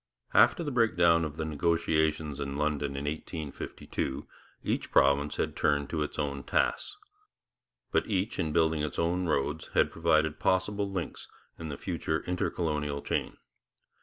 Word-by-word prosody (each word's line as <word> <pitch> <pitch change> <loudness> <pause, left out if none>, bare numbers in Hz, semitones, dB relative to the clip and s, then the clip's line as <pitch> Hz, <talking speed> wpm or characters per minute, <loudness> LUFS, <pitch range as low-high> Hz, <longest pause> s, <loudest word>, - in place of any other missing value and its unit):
After 170 - +5
the 145 - -2
breakdown 85 -9 +4
of 75 -1 -4
the 80 - -2
negotiations 80 -1 +1
in 70 0 -3
London 75 -2 -1
in 70 - -3
1852, 75 -3 -4 0.4
each - - -1
province 70 +2 +3
had - - -1
turned 70 -1 +1
to 80 - -1
its 75 - -3
own 70 -2 -2
tasks. - - 0 0.9
But - - +2
each 100 +1 -1
in 80 - 0
building 80 -1 +2
its 75 -2 -3
own 90 +2 +1
roads 70 -4 0
had - - +4
provided 80 -2 +2
possible 100 +2 +1
links 95 -4 -4 0.3
in 80 -1 -5
the 70 - -5
future 80 -2 -2
Intercolonial 75 -5 -1
chain. - - -2
80 Hz, 145 wpm, -30 LUFS, 75-85 Hz, 0.9 s, After